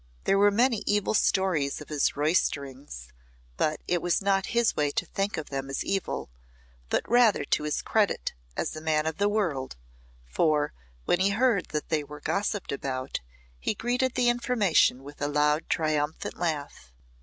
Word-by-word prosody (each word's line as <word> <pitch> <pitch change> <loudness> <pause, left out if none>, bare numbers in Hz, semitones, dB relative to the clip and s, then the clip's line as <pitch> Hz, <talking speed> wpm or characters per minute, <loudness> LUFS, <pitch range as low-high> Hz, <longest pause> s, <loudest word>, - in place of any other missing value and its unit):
There 195 - +3
were 205 +1 +6
many 230 +2 +2
evil 205 0 +1
stories 190 -9 +1
of 150 - -11
his 150 -3 +1
roysterings, 140 - -1 0.5
but 155 - 0
it 175 -1 +1
was 175 -1 +1
not 195 -1 +1
his 235 -1 +2
way 150 -1 +1
to - - -1
think 195 +1 -2
of 155 -2 -6
them 135 0 -3
as 135 - -3
evil, 195 - -2 0.6
but - - 0
rather 235 -7 +4
to 150 - +1
his 150 - -1
credit - - +1 0.2
as - - -2
a 155 - -6
man 155 -1 +1
of 160 - -2
the 205 +1 +2
world, 165 - -1 0.5
for, 150 - +1 0.3
when 175 - +2
he 190 +2 +3
heard 225 -1 +2
that 150 -1 -4
they 155 -2 +1
were 150 +1 -10
gossiped 200 +5 -2
about, 130 -1 -3 0.4
he 215 - -1
greeted 250 +3 0
the 245 -1 +2
information 230 - +2
with 145 +2 -12
a 145 - +1
loud 150 +1 +1
triumphant 155 -1 -1
laugh. 145 - -3
160 Hz, 170 wpm, -27 LUFS, 145-205 Hz, 0.6 s, were